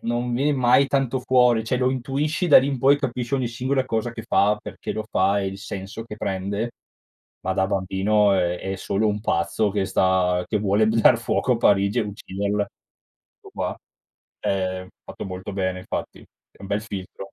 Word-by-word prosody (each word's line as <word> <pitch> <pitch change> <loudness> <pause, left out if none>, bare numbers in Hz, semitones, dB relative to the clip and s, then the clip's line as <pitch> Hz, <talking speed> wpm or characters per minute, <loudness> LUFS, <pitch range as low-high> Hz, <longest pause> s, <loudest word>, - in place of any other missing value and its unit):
non 120 +1 -1
viene 140 +5 +1
mai 130 +1 +4
tanto 135 -2 0
fuori, 125 -3 +3
cioè, 125 - 0
lo 125 0 +2
intuisci, 140 +7 -1
da 150 - +9
lì 130 - +1
in 135 -3 -2
poi 140 +3 +5
capisci 125 -1 -2
ogni 130 -3 0
singola 130 +2 -1
cosa 115 -1 -2
che 115 - -7
fa, 105 0 +2
perché - - -6
lo 110 - -4
fa, 100 +2 +2
e 95 - -2
il 95 0 -5
senso 100 +2 -7
che 105 -2 -9
prende, 100 +4 -2 0.7
ma 95 - -1
da 95 - +2
bambino 100 +2 +2
è 90 -1 0
è 95 0 -4
solo 105 +3 0
un 105 0 -1
pazzo 85 +2 0
che 100 -2 0
sta 95 -1 +2
che 105 - 0
vuole 105 +1 +2
dar 110 0 +5
fuoco - - 0
a - - -1
Parigi 100 +3 +3
e - - +1
ucciderla, 100 0 -2 0.8
tutto - - -14
qua. - - -3 0.6
Ehm, 95 -1 -1
è - - -17 0.2
fatto - - -8
molto 95 +2 -6
bene 95 -1 -1
infatti, - - -5
è - - -25
un - - -7
bel 105 +1 -1
filtro. 100 -1 -8
105 Hz, 195 wpm, -23 LUFS, 95-125 Hz, 0.8 s, da